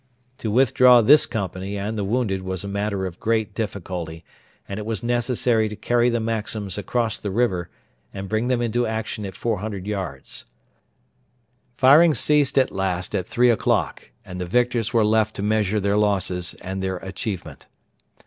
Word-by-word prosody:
To 110 - -3
withdraw 125 +1 +5
this 140 +1 +6
company 100 -2 -4
and 105 +3 -3
the 105 - -2
wounded 100 -2 -1
was 95 0 -4
a - - -5
matter 100 -1 -2
of 90 -2 -7
great 110 -2 0
difficulty; 90 -6 -5 0.4
and 100 +1 -5
it 105 - -6
was 115 -2 -3
necessary 120 -2 +1
to 105 - -7
carry 120 +3 +2
the 120 -1 0
Maxims 110 -3 -2
across 115 +2 -1
the 100 - -4
river 95 -5 0 0.4
and 95 0 -6
bring 110 +4 -1
them 125 -2 +1
into 120 +1 0
action 110 -2 -4
at 95 - -9
400 105 -4 -3
yards. 95 -10 -5 1.3
Firing 150 +4 +6
ceased 145 +3 +2
at 130 - +3
last 95 -2 -2
at 90 - -2
three 125 0 +3
o'clock, 115 - -1 0.2
and 90 0 -7
the 90 - -3
victors 120 +1 +1
were 115 -2 +3
left 110 0 +2
to 100 - -4
measure 105 -1 +1
their 100 +1 +1
losses 95 -4 0
and 95 +1 -5
their 95 -1 -2
achievement. 95 0 -6
105 Hz, 170 wpm, -23 LUFS, 95-120 Hz, 1.3 s, this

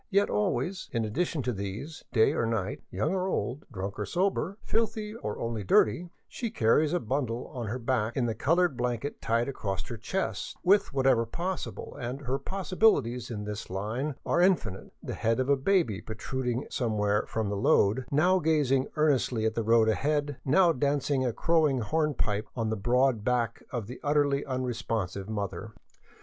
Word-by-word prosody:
Yet 200 0 +2
always, 125 - -1
in 115 -2 0
addition 150 +6 -1
to 125 - -1
these, 105 +10 -6
night 110 -1 +5
or - - 0
day, 110 -4 -2
young 105 - -1
or 185 -1 0
old, 140 -6 -2
drunk 95 +1 -5
or - - -1
sober, 195 +2 0
filthy 220 -1 -1
or 165 - -5
only 115 -2 -3
dirty, 110 - +3 0.2
she 235 - -4
carries 150 - +3
a 175 - +1
bundle 125 -2 -2
on 120 -4 -4
her 115 +5 -2
back 120 -2 -1
in 125 - +2
the 115 - 0
colored 170 +3 +2
blanket 125 +3 -2
tied 115 +1 +1
across 100 -8 -3
her 120 - -5
chest, 190 - -3
with, 200 +2 +4
whenever 130 -4 +3
possible 180 +9 -4
— - - -10
and 125 +4 -4
her 135 0 -2
possibilities 185 - +1
in 105 -3 -4
this 105 0 -5
line 110 +10 -2
are 170 - +2
infinite 180 - +1
— - - -33
the - - -4
head 115 +2 0
of 130 +1 0
a 140 - +6
baby 140 - +1
protrud 125 +3 -4
ing 120 +2 -1
somewhere 105 -4 +1
from 110 -3 -2
the 100 - -1
load, 100 +4 +3
now 180 +6 +3
gazing 145 -5 +2
earnestly 130 -7 +2
at 110 - +1
the 115 - -1
road 115 0 +4
ahead, 145 +4 0
now 170 +5 +5
dancing 140 0 +1
a 125 - +1
crowing 155 +2 +2
hornpipe 120 -5 0
on 115 -3 -1
the - - 0
broad 120 +2 +2
back 120 -1 0
of 120 -6 -3
the 125 +5 -8
utterly 145 -1 +2
un 130 -2 -2
responsive 110 -5 -3
mother. 105 0 -4
125 Hz, 185 wpm, -29 LUFS, 110-150 Hz, 0.2 s, a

